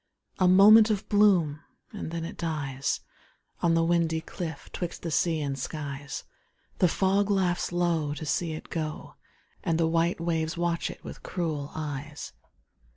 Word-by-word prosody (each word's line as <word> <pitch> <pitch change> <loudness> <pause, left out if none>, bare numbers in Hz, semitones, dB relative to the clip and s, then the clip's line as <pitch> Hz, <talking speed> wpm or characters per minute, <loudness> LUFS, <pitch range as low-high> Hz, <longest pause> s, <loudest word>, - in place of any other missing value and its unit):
A 185 - +4
moment 210 +4 +8
of 205 -3 -1
bloom, 185 -8 +4 0.3
and - - -5
then 165 0 -4
it - - -7
dies 145 -5 -2 0.6
On 165 -1 +3
the 165 - +3
windy 165 -1 +2
cliff 160 -1 -6
'twixt 175 -1 -5
the 165 - -3
sea 160 0 +1
and 140 -2 -3
skies. 140 0 -5 0.6
The 180 - +5
fog 195 +3 +2
laughs 185 -4 +1
low 170 -4 0
to 155 - -6
see 165 +2 -1
it 155 - -9
go, 155 -2 -4 0.5
And 165 -1 +1
the 165 - +3
white 165 +2 +1
waves 165 -1 -1
watch 170 -1 0
it - - -10
with - - -9
cruel 155 -6 -3
eyes. 150 -1 -5
165 Hz, 155 wpm, -28 LUFS, 155-175 Hz, 0.6 s, moment